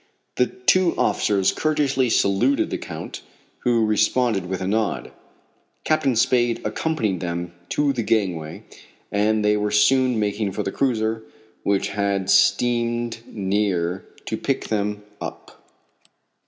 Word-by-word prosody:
The 125 Hz, -, +3 dB
two 175 Hz, +8 st, +2 dB
officers 100 Hz, -2 st, +2 dB
courteously 140 Hz, -5 st, +1 dB
saluted 110 Hz, +6 st, +2 dB
the -, -, -2 dB
Count, -, -, -7 dB, 0.4 s
who 120 Hz, -2 st, +2 dB
responded 110 Hz, -2 st, +1 dB
with 95 Hz, 0 st, -3 dB
a 95 Hz, -, -3 dB
nod. 110 Hz, +1 st, -1 dB, 0.7 s
Captain 140 Hz, -5 st, +1 dB
Spade 120 Hz, +1 st, +2 dB
accompanied 110 Hz, -, -1 dB
them 85 Hz, 0 st, -4 dB, 0.2 s
to 145 Hz, -1 st, +1 dB
the 120 Hz, -, -2 dB
gangway, 90 Hz, -9 st, -1 dB, 0.5 s
and 105 Hz, +1 st, +1 dB
they 105 Hz, 0 st, +3 dB
were 105 Hz, 0 st, 0 dB
soon 120 Hz, +3 st, +3 dB
making 105 Hz, -1 st, -1 dB
for -, -, -2 dB
the 95 Hz, -, -3 dB
cruiser, 110 Hz, -3 st, 0 dB, 0.4 s
which 100 Hz, -1 st, 0 dB
had 100 Hz, -1 st, 0 dB
steamed 120 Hz, +4 st, +2 dB
near 95 Hz, -3 st, -1 dB, 0.2 s
to -, -, -3 dB
pick -, -, -2 dB
them 105 Hz, -1 st, -1 dB, 0.2 s
up. -, -, -9 dB
105 Hz, 125 wpm, -23 LUFS, 100-120 Hz, 0.7 s, The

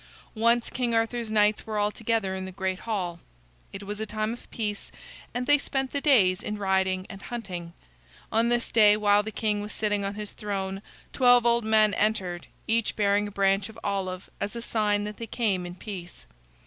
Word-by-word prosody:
Once 235 Hz, +1 st, +2 dB
King 240 Hz, -2 st, 0 dB
Arthur's 225 Hz, 0 st, 0 dB
knights 210 Hz, 0 st, +2 dB
were 215 Hz, -1 st, -2 dB
all 205 Hz, 0 st, +2 dB
together 225 Hz, -3 st, -1 dB
in 190 Hz, 0 st, -4 dB
the 190 Hz, -, -7 dB
great 190 Hz, 0 st, -2 dB
hall. 180 Hz, -5 st, -2 dB, 0.5 s
It 195 Hz, -, -7 dB
was 205 Hz, +1 st, -5 dB
a 220 Hz, -, -2 dB
time 215 Hz, +1 st, -2 dB
of 240 Hz, -, -12 dB
peace, 210 Hz, -3 st, -4 dB, 0.4 s
and 245 Hz, +1 st, -2 dB
they 290 Hz, +2 st, +5 dB
spent 270 Hz, -1 st, -2 dB
the 285 Hz, -, -1 dB
days 200 Hz, -11 st, +4 dB
in 210 Hz, -, -4 dB
riding 190 Hz, -1 st, +1 dB
and 195 Hz, -, -10 dB
hunting. 180 Hz, -9 st, -6 dB, 0.6 s
On 230 Hz, +2 st, +3 dB
this 240 Hz, 0 st, 0 dB
day, 210 Hz, -2 st, +6 dB
while 205 Hz, -1 st, +4 dB
the 215 Hz, -, -5 dB
king 210 Hz, -1 st, 0 dB
was 210 Hz, +1 st, -6 dB
sitting 210 Hz, -2 st, 0 dB
on 200 Hz, +1 st, -3 dB
his 210 Hz, -1 st, -6 dB
throne, 195 Hz, -2 st, -4 dB, 0.3 s
twelve 245 Hz, -2 st, +5 dB
old 235 Hz, -1 st, +3 dB
men 215 Hz, -1 st, +4 dB
entered, 190 Hz, -5 st, 0 dB, 0.2 s
each 225 Hz, 0 st, +1 dB
bearing 205 Hz, 0 st, +2 dB
a -, -, -8 dB
branch 195 Hz, +1 st, +1 dB
of 220 Hz, -, -12 dB
olive, 190 Hz, -2 st, -2 dB
as 205 Hz, +3 st, -3 dB
a 235 Hz, -, -4 dB
sign 210 Hz, -3 st, +1 dB
that 210 Hz, 0 st, -6 dB
they 230 Hz, -, -6 dB
came 195 Hz, -8 st, 0 dB
in 175 Hz, -, -8 dB
peace. 180 Hz, -3 st, -8 dB
210 Hz, 200 wpm, -27 LUFS, 195-225 Hz, 0.6 s, day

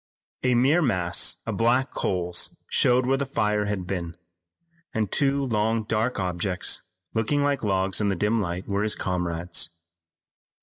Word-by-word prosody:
A 125 Hz, -1 st, +2 dB
mere 140 Hz, +8 st, +4 dB
mass 90 Hz, -, +1 dB
of -, -, -3 dB
black 125 Hz, +4 st, +2 dB
coals 90 Hz, -2 st, -1 dB
showed 125 Hz, 0 st, +4 dB
where 135 Hz, +1 st, +2 dB
the 140 Hz, -, -1 dB
fire 105 Hz, -5 st, +1 dB
had 100 Hz, -3 st, -2 dB
been, 85 Hz, -2 st, -4 dB, 0.8 s
and 110 Hz, -3 st, 0 dB
two 140 Hz, 0 st, +2 dB
long 110 Hz, -1 st, +1 dB
dark 110 Hz, +2 st, 0 dB
objects 90 Hz, 0 st, 0 dB, 0.3 s
looking 140 Hz, +6 st, +1 dB
like 145 Hz, -1 st, +1 dB
logs 95 Hz, -1 st, +1 dB
in 105 Hz, -, +2 dB
the 100 Hz, -, +1 dB
dim 105 Hz, +5 st, +1 dB
light 90 Hz, 0 st, -4 dB
were 100 Hz, 0 st, 0 dB
his 105 Hz, 0 st, +2 dB
comrades. 90 Hz, -1 st, -2 dB
105 Hz, 150 wpm, -25 LUFS, 90-125 Hz, 0.8 s, mere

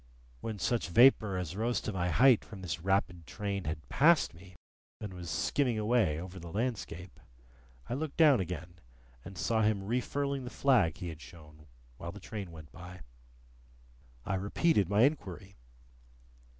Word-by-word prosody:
When 110 Hz, -, -5 dB
such 100 Hz, +2 st, -1 dB
vapour 110 Hz, -1 st, +5 dB
as 90 Hz, -1 st, -4 dB
rose 115 Hz, +3 st, 0 dB
to 110 Hz, -, -4 dB
my 90 Hz, -1 st, -1 dB
height 125 Hz, +4 st, +5 dB
from 100 Hz, -4 st, -11 dB
this 85 Hz, -1 st, -3 dB
rapid 90 Hz, -3 st, 0 dB
train 100 Hz, -3 st, -4 dB
had 75 Hz, -1 st, -5 dB
passed 160 Hz, -, +4 dB
me, 90 Hz, +2 st, -15 dB, 0.4 s
and 105 Hz, -3 st, -6 dB
was 90 Hz, -2 st, -7 dB
skimming 115 Hz, -, 0 dB
away 110 Hz, -8 st, +2 dB
over 90 Hz, +2 st, -8 dB
the 85 Hz, -1 st, -9 dB
landscape, 100 Hz, -5 st, -4 dB, 0.7 s
I -, -, -3 dB
looked 150 Hz, +2 st, -4 dB
down 150 Hz, -7 st, +6 dB
again, 90 Hz, -1 st, -5 dB, 0.4 s
and 95 Hz, -1 st, -10 dB
saw 110 Hz, +4 st, +1 dB
him 105 Hz, -2 st, +1 dB
refurling 135 Hz, +5 st, -2 dB
the 125 Hz, -, -6 dB
flag 120 Hz, -, +2 dB
he 90 Hz, -, -5 dB
had 80 Hz, -1 st, -9 dB
shown 75 Hz, -3 st, -14 dB, 0.3 s
while 85 Hz, -, -6 dB
the 105 Hz, -, -10 dB
train 105 Hz, -5 st, -6 dB
went 80 Hz, -3 st, -12 dB
by. 90 Hz, +1 st, -11 dB, 1.2 s
I 100 Hz, -, -2 dB
repeated 100 Hz, -, +1 dB
my 105 Hz, +3 st, +4 dB
inquiry. 100 Hz, -, -1 dB
95 Hz, 160 wpm, -31 LUFS, 85-120 Hz, 1.2 s, down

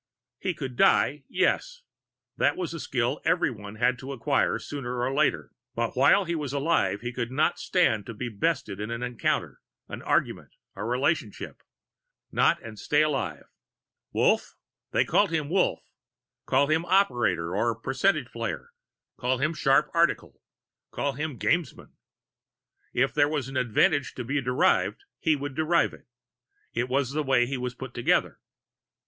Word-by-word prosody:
He 185 Hz, -3 st, -2 dB
could 130 Hz, -5 st, -6 dB
die, 135 Hz, -1 st, +3 dB
yes -, -, 0 dB, 0.5 s
that -, -, +2 dB
was 175 Hz, -3 st, -3 dB
a 165 Hz, -, -5 dB
skill 125 Hz, 0 st, -1 dB
everyone 110 Hz, -, -1 dB
had 125 Hz, +2 st, +1 dB
to 135 Hz, +1 st, -6 dB
acquire, 140 Hz, +3 st, +1 dB
sooner 125 Hz, -4 st, -5 dB
or 125 Hz, +2 st, 0 dB
later. 150 Hz, +1 st, +1 dB, 0.2 s
But 115 Hz, 0 st, -2 dB
while 140 Hz, +9 st, +5 dB
he 170 Hz, -, -2 dB
was 150 Hz, -4 st, -3 dB
alive, 140 Hz, -7 st, +1 dB
he 120 Hz, +1 st, -4 dB
could 120 Hz, -1 st, -3 dB
not 150 Hz, +6 st, +1 dB
stand 110 Hz, -, +1 dB
to 115 Hz, -, -7 dB
be 125 Hz, +3 st, -4 dB
bested 120 Hz, -3 st, -2 dB
in 105 Hz, +1 st, -4 dB
an 115 Hz, +1 st, -4 dB
encounter, 125 Hz, -2 st, -2 dB, 0.3 s
an -, -, -7 dB
argument, -, -, -1 dB, 0.2 s
a 95 Hz, -, -5 dB
relationship 125 Hz, +1 st, -1 dB, 0.7 s
not -, -, +3 dB
and 110 Hz, -2 st, -9 dB
stay 150 Hz, +1 st, +2 dB
alive. 150 Hz, -3 st, -2 dB, 0.7 s
Wolf? -, -, +1 dB, 0.5 s
Call 205 Hz, -, +3 dB
him 160 Hz, -4 st, -2 dB
Wolf. 185 Hz, +2 st, +1 dB, 0.6 s
Call 135 Hz, +2 st, +4 dB
him 155 Hz, +3 st, +1 dB
Operator, 120 Hz, -, +2 dB
or 115 Hz, +3 st, +1 dB
Percentage 135 Hz, +12 st, 0 dB
Player; 475 Hz, -, -5 dB, 0.5 s
call 130 Hz, +1 st, +1 dB
him 155 Hz, +5 st, 0 dB
Sharp 140 Hz, 0 st, +2 dB
Article; 170 Hz, 0 st, +1 dB, 0.5 s
call 140 Hz, -1 st, -2 dB
him 150 Hz, -1 st, -4 dB
Gamesman. 170 Hz, +5 st, -1 dB, 1.0 s
If 135 Hz, +2 st, +1 dB
there 145 Hz, -1 st, +3 dB
was 145 Hz, -4 st, -2 dB
an 135 Hz, -, -8 dB
advantage 130 Hz, -, +2 dB
to 125 Hz, -, -4 dB
be 135 Hz, +4 st, -1 dB
derived, 125 Hz, -, +1 dB, 0.2 s
he 160 Hz, -3 st, +2 dB
would 145 Hz, 0 st, -5 dB
derive 160 Hz, +4 st, +2 dB
it. -, -, -16 dB, 0.7 s
It 125 Hz, -, -1 dB
was 135 Hz, 0 st, 0 dB
the 155 Hz, +2 st, -1 dB
way 130 Hz, -4 st, +3 dB
he 135 Hz, +3 st, -3 dB
was 125 Hz, 0 st, -4 dB
put 130 Hz, -1 st, -8 dB
together. 120 Hz, -, +1 dB
135 Hz, 155 wpm, -27 LUFS, 125-155 Hz, 1.0 s, while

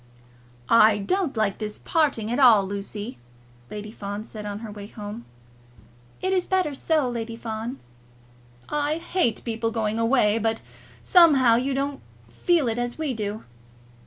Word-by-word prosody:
"I 215 Hz, -1 st, +6 dB
don't 305 Hz, -, -1 dB
like 215 Hz, -3 st, 0 dB
this 210 Hz, -1 st, -4 dB
parting 280 Hz, -9 st, 0 dB
at 245 Hz, -, 0 dB
all, 225 Hz, -7 st, +7 dB
Lucy," 205 Hz, -, -6 dB, 0.5 s
Lady 210 Hz, 0 st, -7 dB
Fawn 205 Hz, 0 st, -6 dB
said 210 Hz, -2 st, -8 dB
on 205 Hz, +1 st, -5 dB
her 215 Hz, -, -7 dB
way 205 Hz, -1 st, -9 dB
home. 210 Hz, +2 st, -8 dB, 1.0 s
"It 375 Hz, +1 st, 0 dB
is 365 Hz, -2 st, +1 dB
better 370 Hz, -6 st, +1 dB
so, 300 Hz, 0 st, +1 dB
Lady 230 Hz, -1 st, -4 dB
Fawn." 230 Hz, +2 st, -5 dB, 0.9 s
"I 295 Hz, +1 st, 0 dB
hate 335 Hz, -7 st, 0 dB
people 225 Hz, -1 st, -1 dB
going 220 Hz, -1 st, -1 dB
away; 230 Hz, -2 st, +3 dB
but, 225 Hz, 0 st, -1 dB, 0.4 s
somehow, 290 Hz, -10 st, +6 dB
you 260 Hz, +3 st, 0 dB
don't 280 Hz, +1 st, -2 dB, 0.3 s
feel 345 Hz, -7 st, +1 dB
it 230 Hz, +1 st, -1 dB
as 245 Hz, 0 st, -3 dB
we 310 Hz, -4 st, -2 dB
do." 215 Hz, -1 st, -4 dB
230 Hz, 150 wpm, -24 LUFS, 215-280 Hz, 1.0 s, all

